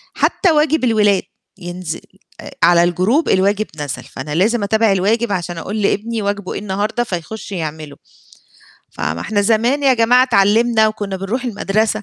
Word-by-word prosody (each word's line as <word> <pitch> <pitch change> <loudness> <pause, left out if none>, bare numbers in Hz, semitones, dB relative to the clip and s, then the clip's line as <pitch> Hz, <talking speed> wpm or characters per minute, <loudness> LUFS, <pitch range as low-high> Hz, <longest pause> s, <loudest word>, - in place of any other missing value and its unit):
حتى 365 -5 +2
واجب 305 -1 +2
الولاد، 210 -5 +3 0.3
ينزل 175 -2 -6 0.4
آآ - - -10
على 170 0 +5
الجروب 185 - +1
الواجب 200 +3 +2
نزل 145 -3 -5
فأنا 150 +3 -7
لازم 215 +4 +1
أتابع 220 +1 +2
الواجب 210 +4 +1
عشان 175 -2 -3
أقول 205 +6 -4
لابني 220 +3 -1
واجبه 200 -1 -3
إيه - - -4
النهارده 210 +4 -2
فيخش 200 +2 -6
يعمله، 155 -4 -5 1.0
ف - - -13
ما 80 +3 -2
إحنا 210 -1 -1
زمان 235 +7 +1
يا 265 -2 +4
جماعة 245 +2 +4
اتعلِمنا 220 0 +3
وكُنا 205 -3 -4
بنروح 215 +7 -3
المدرسة 215 -1 -1
205 Hz, 155 wpm, -17 LUFS, 185-230 Hz, 1.0 s, على